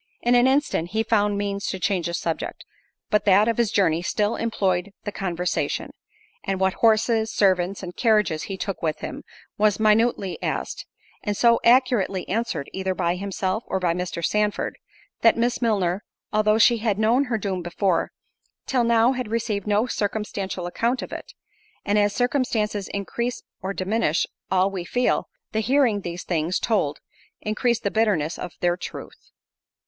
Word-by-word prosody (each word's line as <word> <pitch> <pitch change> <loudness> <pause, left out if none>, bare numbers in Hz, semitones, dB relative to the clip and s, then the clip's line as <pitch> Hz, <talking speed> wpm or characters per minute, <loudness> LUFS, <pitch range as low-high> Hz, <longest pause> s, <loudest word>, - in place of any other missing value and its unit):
In 240 - +3
an 245 +1 +5
instant 265 - +1
he 220 0 +1
found 210 -2 +2
means 200 0 -2
to 190 - -2
change 185 -3 0
the 170 - -2
subject, 165 -1 -4 0.5
but 210 - +3
that 205 +2 +5
of 230 - +1
his 235 -3 +2
journey 165 -4 +2
still 210 +4 0
employed 195 -4 -1
the 205 - -4
conversation; 180 -2 -2 0.5
and 195 -2 -2
what 190 0 +2
horses, 225 0 +2
servants, 190 -1 +1
and 180 -1 -7
carriages 210 -9 +2
he 195 - -4
took 195 0 -4
with 155 -2 -2
him, - - -6 0.4
was 210 -1 +3
minutely 215 -3 +2
asked, - - -3 0.3
and 205 -1 -2
so 235 -1 +5
accurately 235 -6 +3
answered, 220 -9 -2
either 190 0 -2
by 170 0 +1
himself 195 +2 -2
or 190 - -1
by 175 -2 +1
Mr. 175 -1 -3
Sandford, 210 0 0 0.4
that 230 - +5
Miss 240 +2 0
Milner, 200 -5 +1 0.3
although 215 0 +3
she 230 +1 +5
had 215 -3 0
known 230 +6 +3
her 240 -3 -1
doom 195 -3 -3
before, 175 +1 0 0.5
till 255 -3 +1
now 235 +1 +4
had 255 -3 -3
received 220 -3 -2
no 210 +2 +2
circumstantial 205 -5 -3
account 235 +8 -1
of - - -8
it—and 425 - -5
as 205 0 +3
circumstances 225 -5 0
increase 235 +5 -3 0.2
or 190 0 -3
diminish 195 -4 0 0.2
all 190 +1 +2
we 190 -3 -4
feel, 245 +7 0 0.2
the 220 - 0
hearing 240 -2 +2
these 175 -1 -5
things 170 +1 0
told, 190 -11 0 0.4
increased 235 +2 0
the 200 - 0
bitterness 195 -8 +1
of 175 - -6
their 175 0 +2
truth. 180 - -9
205 Hz, 165 wpm, -24 LUFS, 185-230 Hz, 0.5 s, an